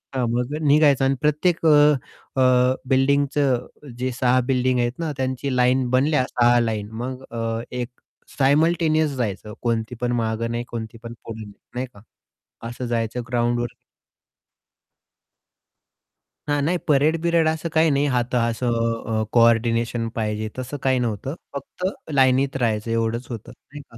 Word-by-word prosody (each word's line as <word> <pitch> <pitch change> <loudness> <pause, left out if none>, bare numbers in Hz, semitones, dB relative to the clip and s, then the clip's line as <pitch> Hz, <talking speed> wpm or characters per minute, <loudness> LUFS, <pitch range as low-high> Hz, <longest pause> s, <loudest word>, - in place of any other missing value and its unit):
हां, 130 -2 +1
मग 125 +4 -1
निघायचा 145 -2 +5
आणि 135 +1 +2
प्रत्येक 155 +3 +1
अ, - - +7 0.7
अ, 130 0 +4
बिल्डिंगचं 135 -1 +2 0.3
जे 130 +1 -1
6 125 0 +3
बिल्डिंग 130 -1 +2
आहेत 120 +5 -1
ना, 165 -2 -2
त्यांची 130 +1 -2
लाईन 125 0 +2
बनल्या 130 +2 +2
6 120 0 +4
लाईन. 110 -3 -2
मग 130 +1 -5
अ, 115 -1 -2
एक 125 -1 -3 0.5
सायमल्टेनियस 155 +2 +3
जायचं 105 -2 -3
कोणती 115 0 -1
पण 120 - 0
मागे 110 +1 -1
नाही, 120 +1 -3
कोणती 115 0 -6
पण 115 - -7
पुढे 110 -1 -7
नाही. 100 - -12 0.2
नाही 130 +1 -2
का. 100 - -16 0.7
असं 125 +1 -6
जायचं 115 +1 -2
ग्राउंडवर 120 0 0 2.7
हां, 145 0 +1
नाही 175 +5 +1
परेड-बिरेड 160 +3 +3
असं 160 +1 -1
काही 160 0 +4
नाही. 140 +1 +2
हात 125 +1 -1
असं 115 +1 0 0.5
अ, - - 0
कोऑर्डिनेशन 115 0 +3
पाहिजे. 110 -1 -2
तसं 130 +3 -5
काही 130 -1 +2
नव्हतं. 120 +4 -3 0.2
फक्त 140 +6 -6 0.3
लाईनीत 135 0 +3
राहायचं 115 -2 -1
एवढच 115 +2 -1
होतं 115 -3 -7
नाही 145 +1 -13
का. 115 - -14
125 Hz, 145 wpm, -22 LUFS, 115-140 Hz, 2.7 s, अ